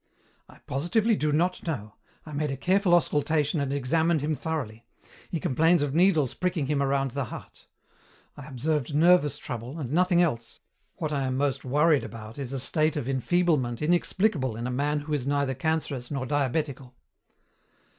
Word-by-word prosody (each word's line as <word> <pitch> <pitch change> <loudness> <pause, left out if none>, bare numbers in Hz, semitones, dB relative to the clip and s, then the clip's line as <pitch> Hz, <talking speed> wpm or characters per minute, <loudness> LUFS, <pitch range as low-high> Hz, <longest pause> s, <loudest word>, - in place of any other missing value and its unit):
"I - - -16
positively 210 - +1
do 150 -5 0
not 175 +4 0
know. 110 -10 -4 0.3
I 155 - -9
made 150 +1 -1
a 135 - -3
careful 185 +3 +3
auscultation 150 -1 +1
and 140 -1 -1
examined 160 +4 +1
him 155 +2 0
thoroughly. 140 -7 -4 0.5
He 170 - -2
complains 160 +4 +3
of 140 -2 -2
needles 160 -6 +3
pricking 180 -5 -1
him 140 0 0
around 135 -1 0
the 140 +1 -2
heart. - - -11 0.7
I 145 -1 -10
observed 145 +1 -2
nervous 165 -1 +4
trouble 125 +5 -6
and 135 -4 -5
nothing 180 +1 +3
else. 120 -10 -1 0.4
What 155 -2 -3
I 140 -2 0
am 130 0 -1
most 140 -1 0
worried 150 +3 +3
about 110 +2 -9
is 135 -2 -5
a 135 - -2
state 155 +4 +1
of 145 -5 -3
enfeeblement 135 -3 +1
inexplicable 170 - +1
in 115 +2 -5
a 125 - -2
man 145 +3 0
who 150 +1 -5
is 140 -3 -1
neither 140 -1 +1
cancerous 140 -3 -2
nor 135 -3 -3
diabetical." 140 -1 -2
145 Hz, 170 wpm, -27 LUFS, 130-160 Hz, 0.7 s, nervous